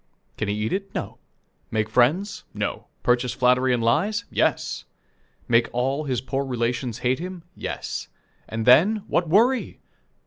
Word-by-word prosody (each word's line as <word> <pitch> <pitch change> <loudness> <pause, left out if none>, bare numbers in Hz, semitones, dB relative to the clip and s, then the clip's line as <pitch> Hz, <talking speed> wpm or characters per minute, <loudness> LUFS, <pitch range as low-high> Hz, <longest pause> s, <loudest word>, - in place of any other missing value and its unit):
Can 105 - -2
he 105 - 0
eat 105 +1 -2
it? 195 0 -4
No. - - -4 0.5
Make 110 -1 0
friends? 150 - +2
No. - - -3 0.2
Purchase 125 0 +2
flattery 125 +1 +3
and 120 -2 +1
lies? 210 - +1
Yes. - - 0 0.6
Make 115 0 +3
all 135 +5 0
his 130 -4 -1
poor 135 +1 -2
relations 120 -2 -2
hate 130 +3 +2
him? 180 0 -6
Yes. - - -5 0.4
And 110 0 -3
then, 195 - +5
what 170 -2 0
worry! 235 +8 +3
130 Hz, 145 wpm, -24 LUFS, 120-180 Hz, 0.6 s, then